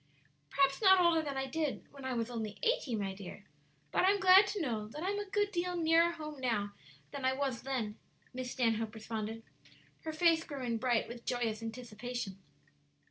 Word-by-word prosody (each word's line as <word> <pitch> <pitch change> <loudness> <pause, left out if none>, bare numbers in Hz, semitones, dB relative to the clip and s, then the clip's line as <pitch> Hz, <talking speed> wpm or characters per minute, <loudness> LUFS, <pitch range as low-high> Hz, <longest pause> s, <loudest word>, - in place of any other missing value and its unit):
"Perhaps 275 +3 +2
not 380 -2 +7
older 340 -2 +4
than 285 -3 -4
I 270 - 0
did 300 +1 -2
when 275 -1 -10
I 260 -1 -1
was 230 +1 -2
only 220 -3 -4
eighty, 300 - +1
my 195 -2 -2
dear; 195 +1 -10 0.5
but - - +2
I 375 - +6
am 405 0 +3
glad 380 +2 +8
to 410 +1 -3
know 225 - -2
that 295 +9 -7
I 380 - 0
am 410 - -2
a 410 -1 -5
good 410 0 +1
deal 360 -1 -1
nearer 335 +1 +4
home 305 -3 -7
now 210 -5 -1 0.4
than 275 - -6
I 260 0 +3
was 265 -3 -2
then," 240 -5 -3 0.3
Miss 255 0 -4
Stanhope 225 -3 0
responded, 220 0 -5 0.6
her 315 - -5
face 325 0 +3
growing 255 -7 -3
bright 240 -2 +1
with 235 0 -9
joyous 230 -3 -1
anticipation. 225 -2 -5
260 Hz, 190 wpm, -33 LUFS, 225-325 Hz, 0.6 s, glad